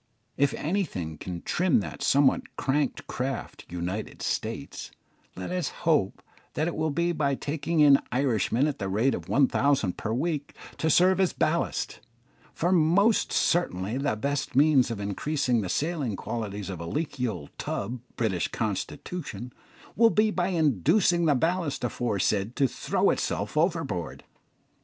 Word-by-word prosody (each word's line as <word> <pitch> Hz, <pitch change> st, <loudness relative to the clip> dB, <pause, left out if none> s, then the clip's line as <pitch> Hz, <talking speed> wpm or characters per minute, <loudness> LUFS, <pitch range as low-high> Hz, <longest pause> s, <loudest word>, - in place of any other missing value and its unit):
If 140 Hz, 0 st, +2 dB
anything 140 Hz, -, -2 dB
can 90 Hz, -2 st, -6 dB
trim 180 Hz, -6 st, +2 dB
that 80 Hz, -7 st, -7 dB
somewhat 140 Hz, -1 st, +2 dB
crank 140 Hz, 0 st, -1 dB
craft 130 Hz, -1 st, -4 dB
"United 90 Hz, +5 st, -4 dB
States," -, -, -3 dB, 0.5 s
let 90 Hz, -, -5 dB
us 180 Hz, -5 st, -1 dB, 0.2 s
hope 150 Hz, -, +2 dB, 0.3 s
that 155 Hz, -, 0 dB
it 170 Hz, -, -3 dB
will 155 Hz, 0 st, 0 dB
be 170 Hz, +4 st, 0 dB
by 145 Hz, -4 st, 0 dB
taking 155 Hz, +3 st, -1 dB
in 140 Hz, -2 st, +7 dB
Irishmen 125 Hz, 0 st, +1 dB
at 150 Hz, -2 st, -2 dB
the 95 Hz, -2 st, -2 dB
rate 110 Hz, +8 st, +2 dB
of -, -, -6 dB
one 135 Hz, -1 st, +4 dB
thousand 130 Hz, -11 st, +1 dB
per 110 Hz, -, -3 dB
week 145 Hz, +3 st, -2 dB, 0.2 s
to 160 Hz, -, +1 dB
serve 185 Hz, +4 st, +4 dB
as 190 Hz, -2 st, +2 dB
ballast; 170 Hz, +2 st, -1 dB, 0.5 s
for 175 Hz, +2 st, 0 dB
most 185 Hz, +6 st, +3 dB
certainly 115 Hz, -, +1 dB
the 140 Hz, -5 st, 0 dB
best 140 Hz, +4 st, -2 dB
means 140 Hz, -3 st, +5 dB
of 115 Hz, -3 st, -4 dB
increasing 125 Hz, +4 st, 0 dB
the 95 Hz, -, -4 dB
sailing 150 Hz, -, -1 dB
qualities 105 Hz, -2 st, -4 dB
of 90 Hz, -, -6 dB
the 85 Hz, -, -6 dB
leaky 140 Hz, -, -2 dB
old 90 Hz, -10 st, -6 dB
tub, 120 Hz, +5 st, -3 dB, 0.2 s
"British 95 Hz, -9 st, 0 dB
Constitution," 125 Hz, -8 st, -4 dB, 0.4 s
will 230 Hz, +1 st, +6 dB
be 215 Hz, 0 st, +3 dB
by 180 Hz, -3 st, 0 dB
inducing 170 Hz, -, +2 dB
the 150 Hz, -3 st, +4 dB
ballast 165 Hz, 0 st, 0 dB
aforesaid 110 Hz, -2 st, 0 dB
to 135 Hz, -, +3 dB
throw -, -, +1 dB
itself 105 Hz, +5 st, -2 dB
overboard. 155 Hz, -, -1 dB
140 Hz, 150 wpm, -27 LUFS, 110-165 Hz, 0.5 s, in